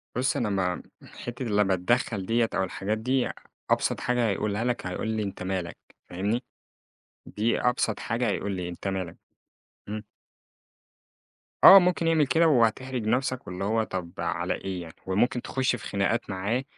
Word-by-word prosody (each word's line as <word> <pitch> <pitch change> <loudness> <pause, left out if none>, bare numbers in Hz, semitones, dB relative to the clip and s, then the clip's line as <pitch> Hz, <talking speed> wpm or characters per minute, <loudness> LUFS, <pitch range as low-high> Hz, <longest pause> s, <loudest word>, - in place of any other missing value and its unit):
بُص 130 +2 +1
أنا 115 - 0
ما 95 -2 -1 0.2
حتّة 120 +1 -7
لمّا 105 -3 +2
أتدخل 100 +1 0
ديّة، 115 +2 +2
أو - - +2
الحاجات 95 +3 -2
دي، 125 +3 0 0.4
أبسط - - +1
حاجة 125 -1 +1
هيقولها 105 +2 -1
لك، 120 -5 -1
هيقول 90 +4 -3
لي 110 -1 -1
أنت 95 -2 -5
مالك 95 -3 -3 0.3
فاهمني؟ 105 +7 -1 0.8
دي 110 +3 0
أبسط 125 -3 +1
حاجة 115 +2 -1
هيقول 100 0 -2
لي 90 -1 -4
أنت 90 +3 -6
مالك. 95 -3 -3 0.7
إمم. 105 +1 -4 1.6
آه، 195 - +12
ممكن 180 -2 +1
يعمل 160 -3 +3
كده 165 +3 +4
وهتحرج 125 -2 +2
نفسك، 130 0 0
واللي 90 +2 -5
هو 110 +2 +1
طب 90 -4 -5
على - - -1
إيه 95 -2 -5
يعني، 80 -1 -10
وممكن 120 +6 +1
تخش 130 -1 0
في - - -7
خناقات 100 +3 0
معاه، 100 +7 -1
110 Hz, 155 wpm, -27 LUFS, 95-125 Hz, 1.6 s, آه